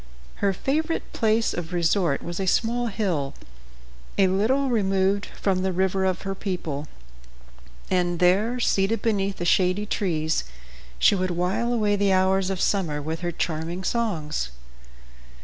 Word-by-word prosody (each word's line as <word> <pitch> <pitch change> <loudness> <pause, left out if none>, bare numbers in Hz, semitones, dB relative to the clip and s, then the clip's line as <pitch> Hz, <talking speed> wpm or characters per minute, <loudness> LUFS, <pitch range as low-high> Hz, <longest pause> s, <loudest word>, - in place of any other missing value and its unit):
Her 200 - +2
favorite 310 - -2
place 225 0 +2
of 175 0 -5
resort 170 -3 +1
was 175 +1 -5
a 190 - -1
small 235 +5 +1
hill, 175 -11 -2 0.8
a 195 - +5
little 220 +9 +2
removed 195 -2 +1
from 190 -2 -1
the 190 0 0
river 190 +1 +1
of 185 -1 -1
her 195 0 -2
people, 170 -7 -4 1.0
and 175 -1 +1
there, 200 +8 +3
seated 210 -1 +1
beneath 200 -3 0
the 175 - -3
shady 185 +3 +2
trees, 160 -7 0 0.5
she - - +5
would 185 -1 0
while 180 +7 0
away 210 -3 +2
the 200 -1 +2
hours 190 0 +2
of 190 -2 -2
summer 170 -8 0
with 160 +2 -4
her 175 -1 -2
charming 165 +2 -3
songs. 165 - -1
190 Hz, 145 wpm, -25 LUFS, 175-205 Hz, 1.0 s, a